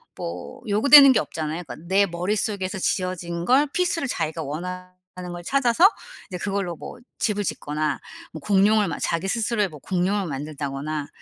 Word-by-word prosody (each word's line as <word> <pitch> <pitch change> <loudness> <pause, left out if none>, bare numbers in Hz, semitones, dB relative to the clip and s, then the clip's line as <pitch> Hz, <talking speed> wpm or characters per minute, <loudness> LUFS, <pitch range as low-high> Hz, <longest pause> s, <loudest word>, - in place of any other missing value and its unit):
뭐 85 +1 -7
요구되는 275 +7 +8
게 - - +3
없잖아요. 160 +2 -4
그러니까 155 - -9
내 195 +2 +4
머릿속에서 190 +2 -2
지어진 175 -2 -2
걸 265 +6 +4
피스를 340 -5 0
자기가 160 -9 -2
원하는 180 +5 -5 0.5
걸 175 - -7
찾아서 275 - +4 0.4
이제 180 - -5
그걸로 195 -3 -2
뭐 205 - -10 0.2
집을 210 -2 0
짓거나 150 -4 -2 0.3
뭐 160 - -6
공룡을 205 +2 +3
막 155 - -4
자기 170 +3 -1
스스로의 215 -1 0
뭐 150 -3 -12
공룡을 190 +4 -1
만든다거나 145 0 -4
185 Hz, 365 characters per minute, -23 LUFS, 160-210 Hz, 0.5 s, 요구되는